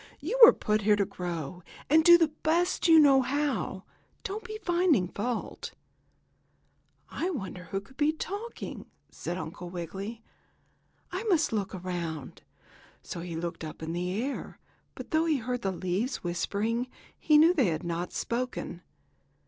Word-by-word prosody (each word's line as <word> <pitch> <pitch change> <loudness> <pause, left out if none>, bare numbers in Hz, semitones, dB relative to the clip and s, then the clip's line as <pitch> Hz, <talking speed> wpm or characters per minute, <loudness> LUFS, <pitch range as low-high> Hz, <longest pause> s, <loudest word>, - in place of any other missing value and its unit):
"You 430 +12 -3
were 460 - +13
put 215 0 0
here 210 +1 +4
to 200 -1 +1
grow, 175 -2 -5 0.3
and 315 +3 +5
do 345 +1 +9
the 330 -2 +3
best 345 +3 +1
you 325 -1 +8
know 280 -3 +7
how. 260 -8 -1 0.4
Don't 410 +3 -4
be 430 -1 -6
finding 345 - +3
fault." 230 +6 -4 1.4
"I 350 - -2
wonder 190 - -5
who 195 +3 -3
can 200 - -19
be 295 +1 +3
talking?" 405 +8 -6 0.2
said 175 - -5
Uncle 175 +1 -6
Wiggily. 195 +6 -6 0.9
"I - - -3
must 335 - +2
look 200 -3 -2
around." 170 -6 -5 0.6
So - - -6
he 170 -1 -5
looked 165 0 -4
up 155 0 -7
in 160 +1 -3
the 180 +1 -2
air, 270 +3 -4 0.4
but - - -9
though 315 +1 +3
he 315 -3 +2
heard 245 0 -3
the 195 - 0
leaves 190 +8 -2
whispering 210 +7 -1 0.3
he 305 -1 +5
knew 325 +4 +7
they 275 - +3
had 160 -3 -1
not 170 +1 -3
spoken. 240 -7 -3
225 Hz, 155 wpm, -29 LUFS, -, 1.4 s, were